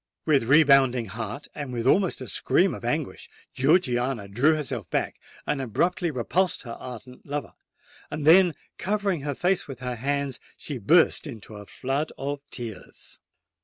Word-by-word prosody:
With 140 -7 +3
rebounding 135 -3 +5
heart—and 115 +7 -6
with 120 -1 -3
almost 185 +2 +3
a 130 - -6
scream - - +2
of - - -8
anguish—Georgiana 125 - -1
drew 135 +10 +3
herself 130 - -4
back, - - -2 0.3
and 145 -2 -1
abruptly 175 - 0
repulsed 165 +7 0
her 120 - -8
ardent 125 +1 -9
lover: 145 +1 -5 0.6
then, 165 +2 +5 0.2
covering 200 -4 0
her 145 0 -3
face 180 +4 +1
with 135 -4 -8
her 125 -1 -3
hands, 140 +1 -2 0.2
she 140 -4 -5
burst 160 - +4
into 110 -5 -9
a 105 -1 -10
flood 135 +4 -2
of 140 +1 -4
tears. 115 -5 -8
135 Hz, 140 wpm, -26 LUFS, 120-155 Hz, 0.6 s, rebounding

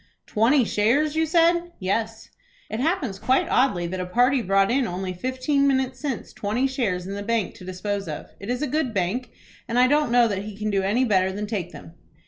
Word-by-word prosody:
"Twenty 240 +4 +3
shares, 275 +10 +1
you 320 0 +1
said?" 340 +1 +2
"Yes." 220 +4 -3 0.4
"It 220 - -3
happens 265 - -1
quite 260 +5 +2
oddly 225 -9 +2
that 185 +2 -4
a 185 - -2
party 250 +7 +3
brought 195 0 +2
in 260 -1 +1
only 185 +1 -4
fifteen 260 - 0
minutes 265 -1 0
since 275 -6 -4
twenty 215 +6 -1
shares 220 -10 -1
in 195 - -5
the 200 - -4
Bank 225 -2 -1
to 180 - -11
dispose 195 +1 -4
of. 150 -2 -7
It 200 - -8
is 250 +3 -1
a - - 0
good 275 -4 -1
bank, 200 +7 -1 0.4
and 235 0 -2
I 250 - +6
don't 295 0 +2
know 240 -1 +5
that 200 -3 -2
he 210 -2 -8
can 215 0 -2
do 195 -1 +1
any 215 +7 +1
better 190 -4 +2
than 205 +2 -4
take 200 -5 -4
them." 165 - -12
230 Hz, 215 wpm, -24 LUFS, 195-265 Hz, 0.4 s, I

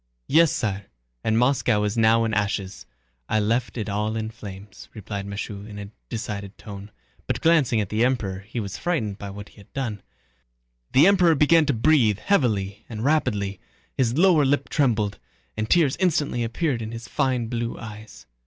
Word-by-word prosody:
"Yes, 165 0 +5
sire, 100 -2 -2 0.4
and 110 0 +1
Moscow 125 -4 +2
is 105 0 -1
now 115 0 +4
in 110 - -2
ashes. 100 - -2 0.4
I 110 - +2
left 115 +4 0
it 110 - -3
all 105 +2 -1
in 110 0 -3
flames," 100 -3 -11
replied 100 -1 -5
Michaud 100 0 -6
in 105 -1 -9
a 100 0 -8 0.2
decided 105 -4 -5
tone, 100 0 -9 0.4
but - - -1
glancing 150 -9 +3
at 100 -3 -2
the 110 +2 +1
Emperor 110 -7 0
he 110 +4 -6
was 100 -4 -5
frightened 115 - -1
by 100 - -6
what 100 +1 -9
he - - -23
had 100 - -17
done. 120 -7 -3 0.9
The 140 - +7
Emperor 180 -4 +5
began 155 +2 +4
to 145 - +2
breathe 115 -4 +3
heavily 110 - 0
and 110 0 -4
rapidly, 105 - 0 0.4
his 125 0 +1
lower 170 -4 +5
lip 140 +1 +1
trembled, 110 - +1 0.4
and 110 0 -3
tears 160 -6 +4
instantly 155 -9 +1
appeared 120 +2 -1
in 110 0 -5
his 115 0 -7
fine 130 -5 0
blue 115 0 -3
eyes. 105 - -10
110 Hz, 175 wpm, -24 LUFS, 105-135 Hz, 0.9 s, The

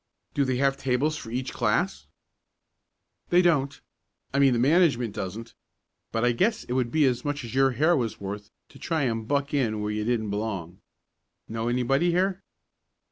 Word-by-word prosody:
"Do 140 - +1
they 130 -1 0
have 135 +1 +1
tables 135 +3 0
for 115 - -8
each 125 +2 -3
class." 120 - 0 1.2
"They 175 +1 +5
don't 140 -5 +2 0.5
I 140 - +2
mean 135 -2 +5
the - - +1
management 135 - +3
doesn't, 110 +5 -6 0.6
but 115 +1 0
I 120 - +4
guess 210 - +1
it 125 - -5
would 125 -2 0
be 150 +4 +3
as 125 -2 +1
much 145 -2 -3
as 115 - -7
your 135 0 +3
hair 160 +5 +4
was 120 -7 -2
worth 100 +1 -6 0.2
to - - -16
try 160 -4 -1
to 120 - +1
buck 140 +6 -2
in 115 -7 +1
where 105 0 -2
you 105 0 -2
didn't 110 -2 -1
belong. 100 -5 -4 0.7
Know 115 +1 -3
anybody 125 +7 +2
here?" 185 +2 +1
125 Hz, 180 wpm, -26 LUFS, 115-145 Hz, 1.2 s, They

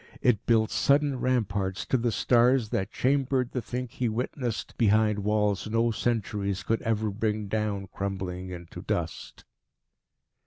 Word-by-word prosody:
It 120 -5 +2
built 110 -2 +3
sudden 140 -1 +2
ramparts 100 -7 0
to - - 0
the 120 -1 +1
stars 120 +1 +3
that 105 -4 -1
chambered 130 0 +1
the 125 - -2
thing 125 +3 -4
he 120 +1 -2
witnessed 120 0 -3
behind 110 -1 +3
walls 105 0 0
no 115 +1 +2
centuries 105 -4 -1
could 115 - 0
ever 110 -1 0
bring 105 0 -1
down 105 -1 -1
crumbling 95 -2 -4
into 85 -2 -8
dust. - - -4
110 Hz, 140 wpm, -27 LUFS, 100-120 Hz, -, built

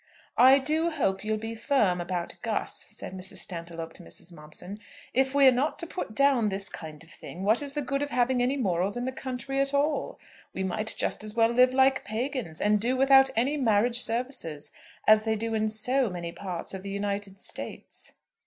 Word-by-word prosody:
"I 260 +2 +8
do 310 +5 +1
hope 205 - -1
you'll 215 0 -1
be 225 +1 -5
firm 220 -7 +1
about 175 0 -3
Gus," - - -2
said - - -8
Mrs. 190 0 -8
Stantiloup 165 -2 -6
to - - -14
Mrs. 175 +1 -12
Momson. 170 +6 -9 0.3
"If 265 +1 +1
we're 275 -2 +7
not 265 +5 0
to - - -4
put 335 -10 -6
down 270 -5 +3
this 195 0 -2
kind 155 -1 -9
of 165 - -18
thing, 180 - -9
what 215 +6 +3
is 285 -1 -3
the 295 -1 -2
good 275 +2 -2
of 290 - -2
having 250 -1 +1
any 255 +3 +1
morals 195 -2 0
in 245 - -2
the 260 - -2
country 260 +1 -4
at 275 +1 +1
all? 295 +2 0 0.4
We 190 - -2
might 215 +3 -2
just - - -2
as 215 0 -7
well 225 -1 +4
live 250 +2 +4
like 265 0 +4
pagans, 225 - -4
and 210 0 +2
do 250 +3 +1
without 270 0 +6
any 265 +7 +1
marriage 235 -1 +3
services, 230 - -1 0.4
as 215 0 +7
they 220 0 0
do 225 +1 -3
in 215 0 +1
so 245 +4 +1
many 170 -2 -5
parts 180 -1 -5
of 190 - -5
the 200 - -7
United 200 -1 -3
States." - - -8
225 Hz, 200 wpm, -27 LUFS, 195-265 Hz, 0.4 s, I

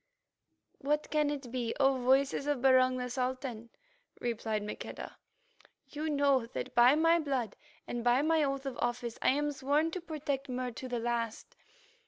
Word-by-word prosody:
"What 295 +2 -1
can 300 -1 +2
it 275 -4 -5
be, 240 -2 -2
O 270 -1 +4
Voices 265 +2 +2
of 290 -3 +1
Barung 255 0 +4
the 250 0 -3
Sultan?" 250 -2 -3 0.5
replied 225 -3 -2
Maqueda. 210 - -7 0.7
"You 305 +2 -3
know 280 -4 +2
that - - -6
by 245 +3 +6
my 330 +2 +4
blood 265 - -2 0.3
and 240 -1 -4
by 245 +3 +3
my 320 0 +3
oath 275 -1 -2
of 270 - -5
office 240 -1 -2
I - - +4
am 295 +2 +1
sworn 290 +4 +1
to 370 - -4
protect 295 -5 -4
Mur 250 0 -3
to 255 +3 -7
the 245 -1 -2
last." 235 -1 -3
260 Hz, 165 wpm, -31 LUFS, 240-290 Hz, 0.7 s, by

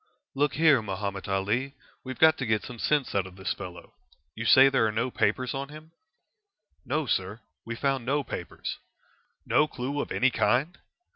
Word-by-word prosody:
"Look 140 -2 +1
here, 155 -4 +5
Mahomet 100 -1 -4
Ali, 105 +8 -1 0.3
we've 130 0 -6
got 160 0 +6
to 130 - -2
get 110 -1 +1
some 120 -2 -9
sense 145 +1 +1
out 95 -2 0
of 90 - -13
this 95 -1 -2
fellow. 90 -1 -10 0.4
You 110 - -6
say 130 +3 +8
there 130 -5 +3
are - - -1
no 115 +4 -1
papers 120 +5 0
on 135 0 -4
him?" 155 +2 -12 0.9
"No, 145 +4 -1
sir; 105 -1 -2 0.2
we 115 +1 -4
found 135 0 0
no 140 +4 0
papers." - - -6 0.7
"No 150 - +3
clue 140 +1 -3
of - - -6
any 130 0 +2
kind?" 135 +9 +1
125 Hz, 180 wpm, -27 LUFS, 105-140 Hz, 0.9 s, say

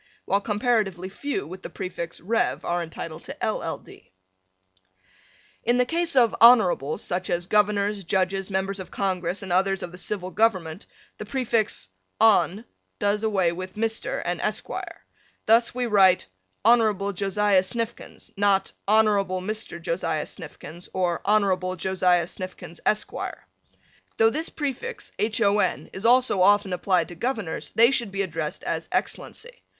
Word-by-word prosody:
while 200 +1 +1
comparatively 210 -4 0
few 285 +9 -4
with 185 +4 -9
the - - -7
prefix 170 -3 -6
"Rev." 225 +6 0
are 175 0 0
entitled 165 -1 -7
to - - -8
"LL. - - -2
D." - - -17 1.5
In 240 +2 +2
the 250 - +3
case 335 +3 0
of 240 -3 +4
Honorables 205 - +5
such 180 +1 -2
as 175 0 0
Governors, 205 0 +1
Judges, 190 +2 0
Members 195 +1 -2
of 190 - -7
Congress, 185 -1 -2
and 190 -2 -3
others 195 +1 +1
of 175 - -6
the 180 - -10
Civil 185 -1 -3
Government 190 -6 0 0.3
the - - -5
prefix 230 - -1 0.3
"Hon." 215 -2 +4 0.3
does 205 0 +1
away 195 -6 +1
with 185 +2 -7
Mr. 225 +1 -2
and - - -2
Esq. - - -2 0.8
Thus 230 +2 +4
we 250 -1 0
write 195 - +4 0.4
Hon. 215 -4 +4
Josiah 200 0 +2
Snifkins, 230 +4 -5
not 200 -1 +2
Hon. 220 +2 +5 0.4
Mr. 215 -4 -5
Josiah 165 -2 -2
Snifkins 165 +1 -10
or 180 -2 0
Hon. 190 -3 +1
Josiah 180 0 +2
Snifkins, 180 -2 -8
Esq. 215 - +1 1.1
Though 225 0 +5
this 315 +5 -2
prefix 295 - -5
Hon. 210 -2 +1
is 195 +4 -1
also 245 -5 +4
often 200 0 +4
applied 180 -2 +1
to - - -8
Governors 220 -4 -3
they 235 +3 +6
should 235 -6 0
be 195 0 -1
addressed 160 -4 -4
as - - -3
Excellency. - - -4
195 Hz, 145 wpm, -25 LUFS, 180-225 Hz, 1.5 s, they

